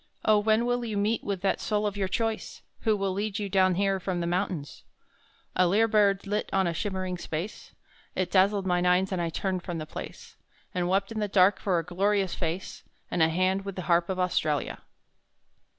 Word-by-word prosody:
Oh! 215 -1 +5
when 220 +2 +2
will 245 0 0
you 220 -3 -3
meet 210 +2 0
with 195 -3 -3
that 195 - +1
soul 210 -1 0
of 205 -1 -1
your 195 -2 -1
choice, 225 +3 -3 0.2
Who 215 -2 +1
will 195 -1 -1
lead 205 +1 -2
you 205 -2 -3
down 185 -1 +3
here 195 0 +1
from 185 -1 -2
the 170 - -1
mountains? 175 -4 -2 0.7
A 185 - +4
lyre 215 +5 +3
bird 205 -3 +3
lit 205 +1 -2
on 195 -1 +2
a 170 - 0
shimmering 185 0 -3
space; 170 +5 -6 0.4
It 185 -1 -1
dazzled 195 +1 +3
mine 180 -1 +2
eyes 185 +2 +3
and 185 -2 -1
I 170 - -1
turned 185 +2 -2
from 175 -1 -5
the 155 - -4
place, - - -9 0.4
And 180 -1 -1
wept 195 +3 +1
in 220 - -3
the 210 - 0
dark 195 0 +4
for 185 -3 +1
a 165 - -1
glorious 195 +1 +1
face, 175 +2 -4 0.3
And 175 - 0
a 160 - +5
hand 185 +3 +1
with 195 -1 -6
the 185 - -4
Harp 170 +1 +2
of 190 - -1
Australia! 160 -5 0
190 Hz, 210 wpm, -28 LUFS, 180-205 Hz, 0.7 s, Oh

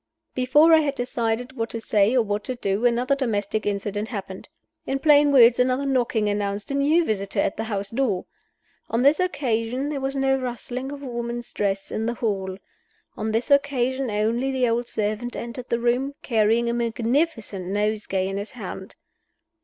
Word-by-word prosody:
Before 295 +6 +5
I 320 - +8
had 290 -2 -1
decided 245 0 -2
what 225 -3 -2
to 230 - -5
say 215 +1 +2
or 240 - +4
what 205 0 -2
to 255 - -3
do, 210 0 +1
another 245 +3 +1
domestic 215 -6 -1
incident 205 +1 -2
happened. 195 -2 -7 0.4
In 270 - 0
plain 290 0 +5
words, 240 -3 +6
another 255 +2 +2
knocking 240 -5 +1
announced 205 +2 -2
a - - -1
new 300 +5 +3
visitor 200 -5 -1
at - - +1
the 225 - -3
house 200 -2 -3
door. 225 -7 0 0.6
On 230 +2 +1
this 285 +5 +5
occasion 265 -6 -1
there 285 -2 -3
was 270 +1 -2
no 270 0 +2
rustling 255 +1 -5
of 285 0 -8
a - - -6
woman's 235 0 -5
dress 195 -1 -1
in 220 +1 -2
the 235 - -1
hall. 195 -5 -2 0.6
On 220 0 -2
this 230 +6 -1
occasion 270 -2 +2
only 225 +5 0
the 255 -2 +1
old 235 +1 0
servant 215 +3 -2
entered 240 +1 -6
the 235 - 0
room, 250 +4 0
carrying 225 0 +2
a 235 - 0
magnificent 230 - -1
nosegay 205 -1 -1
in 195 0 -3
his 200 +2 -6
hand. - - -8
235 Hz, 180 wpm, -24 LUFS, 210-265 Hz, 0.6 s, I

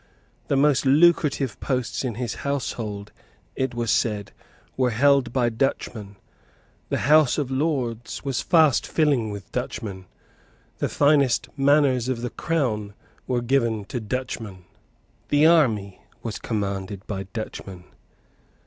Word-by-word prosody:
The - - +1
most 140 -1 +3
lucrative 145 -4 +3
posts 130 -2 -2
in 120 -4 -3
his 120 -1 -4
household, 110 -7 -3 0.4
it 130 -2 -2
was 120 -2 0
said, 105 -3 0 0.4
were 130 -1 +2
held 135 +1 +3
by 120 -2 +1
Dutchmen; 110 -4 -2 0.7
the - - 0
House 150 -1 +5
of 140 -4 -2
Lords 130 -5 -2
was 135 -2 -1
fast 155 -6 +3
filling 140 -8 +1
with 100 -3 -8
Dutchmen; 95 -4 -5 0.7
the - - 0
finest 140 -5 +3
manors 135 -3 +3
of 125 -3 -2
the 125 - -3
Crown 110 -11 -2 0.3
were 125 -2 0
given 115 -5 +1
to 125 - -1
Dutchmen; 110 -5 -5 0.6
the 145 +1 +4
army 115 - +3 0.2
was 115 -3 -4
commanded 100 -2 -3
by 95 -2 -5
Dutchmen. 100 -5 -7
125 Hz, 125 wpm, -24 LUFS, 105-140 Hz, 0.7 s, House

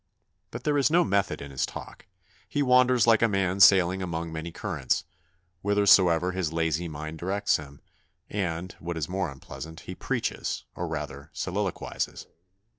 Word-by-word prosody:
But - - -7
there 145 -1 +2
is 140 - +4
no 175 +3 +4
method 100 - 0
in 70 - -9
his 65 - -2
talk; - - -7 0.4
he 145 - 0
wanders 125 -2 +5
like 115 -2 +5
a 115 - +5
man 95 -2 0
sailing 95 -1 +6
among 85 -2 -3
many 80 +1 -5
currents, 80 -9 -1 0.6
whithersoever 95 -4 +4
his 90 -4 -2
lazy 80 +1 0
mind 80 0 -6
directs 100 +4 +1
him; 70 -1 -11 0.5
and, 90 -3 -3
what 85 0 -4
is 80 - -2
more 95 -1 -2
unpleasant, 80 +4 -9
he - - -7
preaches, - - -2
or 90 - -4
rather 75 -2 -5
soliloquises. 95 -1 -3
90 Hz, 155 wpm, -27 LUFS, 80-100 Hz, 0.6 s, sailing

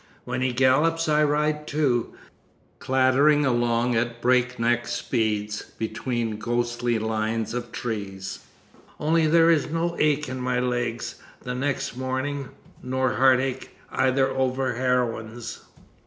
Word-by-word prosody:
When - - -3
he 130 0 +1
gallops 150 +7 +3
I 150 0 +3
ride 150 +1 0
too, 135 -6 0 0.6
clattering 135 +3 +3
along 120 -1 +1
at 115 0 -1
breakneck 120 -1 +1
speed 105 -3 -1 0.2
between 115 0 -3
ghostly 120 +1 -1
lines 110 0 -1
of 120 -1 -4
trees. 100 -4 -5 0.6
Only 160 +1 +2
there 165 +1 +5
is 155 -2 +2
no 170 +2 -1
ache 150 -1 +2
in 130 0 -5
my 125 0 0
legs 120 -1 -2 0.2
the 125 - -4
next 135 0 -2
morning. 130 +1 -3 0.3
Nor 130 0 0
heartache 130 +1 +2
either 130 0 +2
over 130 -1 0
heroines. 120 -2 -2
125 Hz, 120 wpm, -25 LUFS, 120-140 Hz, 0.6 s, there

